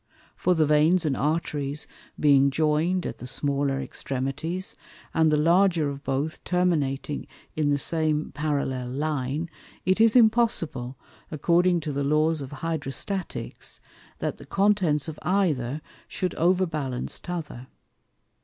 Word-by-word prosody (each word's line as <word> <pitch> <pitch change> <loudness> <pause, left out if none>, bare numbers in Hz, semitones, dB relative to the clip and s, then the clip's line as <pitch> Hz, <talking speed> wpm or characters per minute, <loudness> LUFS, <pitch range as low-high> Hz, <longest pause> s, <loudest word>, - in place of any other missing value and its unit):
For 180 - +2
the 160 -2 +3
Veins 155 +4 +4
and 145 -3 +1
Arteries 150 -1 -1 0.3
being 140 -2 +5
join'd 155 +5 +1
at - - -5
the 125 - -7
smaller 140 0 0
Extremities, 140 +9 -3 0.4
and 160 -1 +3
the 150 - +3
larger 170 0 +3
of 140 0 -7
both 140 +4 -2
terminating 150 -6 0 0.3
in 150 -2 +1
the 145 - +3
same 155 0 0
parallel 140 -4 -2
Line, 145 +2 -2 0.4
it 190 +4 +3
is 225 0 +5
impossible, 220 - +2 0.3
according 170 +3 +2
to 150 - -3
the 140 0 -1
Laws 155 +2 +2
of 135 - -6
Hydrostaticks, 160 +5 -3 0.4
that - - -3
the - - -11
contents 195 -8 +2
of 155 -1 -7
either 155 -7 0 0.2
shou'd 185 -2 -2
overbalance 165 -8 0
t'other. 155 -8 -6
155 Hz, 125 wpm, -26 LUFS, 140-175 Hz, 0.4 s, being